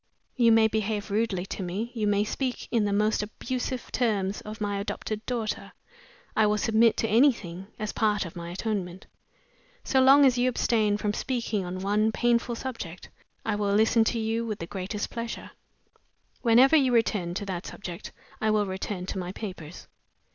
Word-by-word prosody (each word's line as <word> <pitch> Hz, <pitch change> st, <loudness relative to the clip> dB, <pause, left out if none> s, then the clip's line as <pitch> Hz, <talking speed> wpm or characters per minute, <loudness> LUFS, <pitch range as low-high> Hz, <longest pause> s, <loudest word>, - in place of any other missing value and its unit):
You 235 Hz, -2 st, +5 dB
may 225 Hz, 0 st, +6 dB
behave 215 Hz, -1 st, -2 dB
rudely 205 Hz, -4 st, 0 dB
to 195 Hz, -, -6 dB
me, 195 Hz, +6 st, -3 dB
you 220 Hz, -4 st, -1 dB
may 205 Hz, 0 st, +3 dB
speak 250 Hz, +4 st, -3 dB
in 230 Hz, -3 st, +2 dB
the 205 Hz, -, 0 dB
most 210 Hz, +2 st, +2 dB
abusive 250 Hz, +4 st, -4 dB
terms 205 Hz, -5 st, 0 dB
of 215 Hz, +1 st, -8 dB
my 205 Hz, -1 st, -1 dB
adopted 215 Hz, +1 st, -4 dB
daughter; 235 Hz, -4 st, -3 dB, 0.6 s
I 215 Hz, -1 st, +4 dB
will 210 Hz, 0 st, +2 dB
submit 225 Hz, +2 st, +3 dB
to 225 Hz, -, 0 dB
anything, 215 Hz, -7 st, +2 dB
as 215 Hz, -2 st, -3 dB
part 210 Hz, -3 st, +1 dB
of 170 Hz, -, -9 dB
my 170 Hz, -1 st, -6 dB
atonement. 190 Hz, -1 st, -3 dB, 0.8 s
So 265 Hz, -, +3 dB
long 275 Hz, +2 st, +7 dB
as 250 Hz, -2 st, +3 dB
you 250 Hz, +1 st, +3 dB
abstain 215 Hz, -4 st, +1 dB
from 210 Hz, 0 st, -1 dB
speaking 230 Hz, -5 st, -2 dB
on 180 Hz, +1 st, -5 dB
one 210 Hz, +3 st, +2 dB
painful 235 Hz, +1 st, +1 dB
subject, 225 Hz, -9 st, -6 dB, 0.4 s
I 220 Hz, -, 0 dB
will 205 Hz, -1 st, 0 dB
listen 225 Hz, +2 st, +4 dB
to 235 Hz, -, 0 dB
you 225 Hz, +1 st, -1 dB
with 215 Hz, -3 st, -3 dB
the 170 Hz, -, -5 dB
greatest 195 Hz, +3 st, -4 dB
pleasure. 230 Hz, -1 st, -5 dB, 0.9 s
Whenever 250 Hz, +5 st, +6 dB
you 270 Hz, -4 st, +4 dB
return 205 Hz, -7 st, +1 dB
to 205 Hz, -, -3 dB
that 185 Hz, -2 st, -4 dB
subject 175 Hz, -4 st, -7 dB, 0.3 s
I 220 Hz, -, +1 dB
shall 215 Hz, -1 st, +3 dB
return 190 Hz, -1 st, -4 dB
to 190 Hz, -, -4 dB
my 180 Hz, 0 st, -4 dB
papers." 180 Hz, -6 st, -8 dB
215 Hz, 175 wpm, -27 LUFS, 195-230 Hz, 0.9 s, long